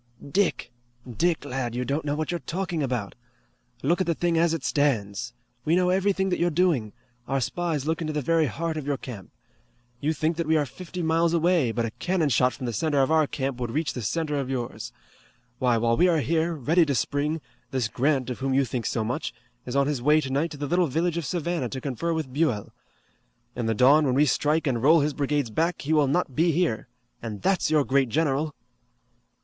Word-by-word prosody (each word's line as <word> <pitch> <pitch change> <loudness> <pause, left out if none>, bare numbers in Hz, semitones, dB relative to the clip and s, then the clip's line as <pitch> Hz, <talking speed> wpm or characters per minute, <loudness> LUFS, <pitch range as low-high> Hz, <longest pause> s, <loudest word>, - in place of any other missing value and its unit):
"Dick! 185 -9 0 0.4
Dick, 160 +6 0
lad, 125 -3 -3
you 125 +1 -2
don't 145 +4 -2
know 145 0 0
what 155 +2 -2
you're 175 - -2
talking 175 +3 -3
about! 125 -7 -2 0.7
Look 170 +7 +2
at 185 - 0
the 170 - +1
thing 175 +1 0
as 165 0 +3
it 165 -4 -2
stands! 120 -6 0 0.3
We 160 +5 +2
know 180 0 +3
everything 190 0 +1
that 180 - -1
you're 175 +1 +2
doing. 155 - +1 0.4
Our 135 +1 0
spies 150 +3 -2
look 160 +2 -1
into 155 -1 -2
the 150 - -1
very 165 +2 +2
heart 165 +6 -3
of 145 -2 -5
your 140 -1 0
camp. 115 -9 -9 0.7
You 150 +4 0
think 155 +2 -1
that 170 -2 -2
we 160 0 +3
are 150 - +1
fifty 180 +5 -7
miles 165 +1 +2
away, 170 -7 +2
but 115 0 -1
a 115 - -4
cannon 175 +3 0
shot 125 0 +3
from 130 - -7
the 120 - -2
center 145 +5 +1
of 135 - 0
our 160 -2 +4
camp 135 -3 -3
would 120 -2 -2
reach 150 +6 -1
the 125 - -5
center 150 +6 -1
of 135 -2 -3
yours. 125 -3 -4 0.7
Why, 125 -2 +3
while 115 +1 +2
we 180 - +4
are 170 -2 +3
here, 165 +3 0
ready 160 +5 +3
to 140 - 0
spring, 150 +5 0 0.3
this 130 -4 -1
Grant, 130 +2 0
of 125 - -6
whom 135 0 0
you 135 0 +3
think 115 -2 -3
so 110 - -1
much, 120 +1 -3 0.3
is 125 - -4
on 140 0 +3
his 145 -3 -1
way 150 +4 +4
tonight 140 +3 -1
to 150 - -9
the 145 - -3
little 175 +4 +2
village 165 +4 0
of 165 -5 -3
Savannah 170 -6 -2
to 130 - -5
confer 135 +6 -3
with 155 -6 -3
Buell. 130 -9 0 0.8
In 120 -2 -2
the 115 - +1
dawn 140 +6 +5
when 130 - +1
we 145 +2 +5
strike 150 +3 +1
and 125 -5 0
roll 155 +4 +6
his 150 +1 0
brigades 145 -3 -1
back 165 +9 0
he 150 +3 0
will 150 -3 +4
not 140 -2 0
be 165 +2 +3
here. 160 -10 0 0.3
And 105 -3 -6
that's 190 -5 +2
your 155 -3 +3
great 135 -2 +2
general!" 150 +2 0
145 Hz, 220 wpm, -26 LUFS, 130-165 Hz, 0.8 s, roll